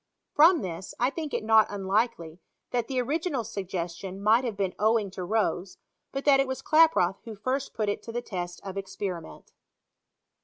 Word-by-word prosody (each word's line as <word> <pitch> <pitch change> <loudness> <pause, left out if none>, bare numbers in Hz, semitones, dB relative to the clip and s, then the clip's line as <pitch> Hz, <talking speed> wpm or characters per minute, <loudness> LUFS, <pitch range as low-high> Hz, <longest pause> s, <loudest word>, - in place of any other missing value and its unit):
From 325 +2 +6
this, 180 0 -6
1 250 +3 +2
think 310 -1 -5
it - - -2
not 220 0 +5
unlikely 195 -4 -1 0.3
that 240 -2 0
the 265 -2 -1
original 285 +1 -1
suggestion 190 -2 -5
might 220 +5 +4
have 230 -5 -3
been 195 -2 -1
owing 215 -1 +2
to 185 - -6
Rose, 195 -2 -1 0.3
hat 275 0 -4
that 280 -2 +6
it 275 - +2
was 260 0 -4
Klaproth 310 - +4
who 225 -2 -7
first 260 +6 -3
put 215 -2 -1
it 205 - -1
to 230 - -8
the 240 +1 -3
test 175 -2 -5
of 195 0 -6
experiment. 190 -3 -6
215 Hz, 180 wpm, -27 LUFS, 190-260 Hz, 0.3 s, From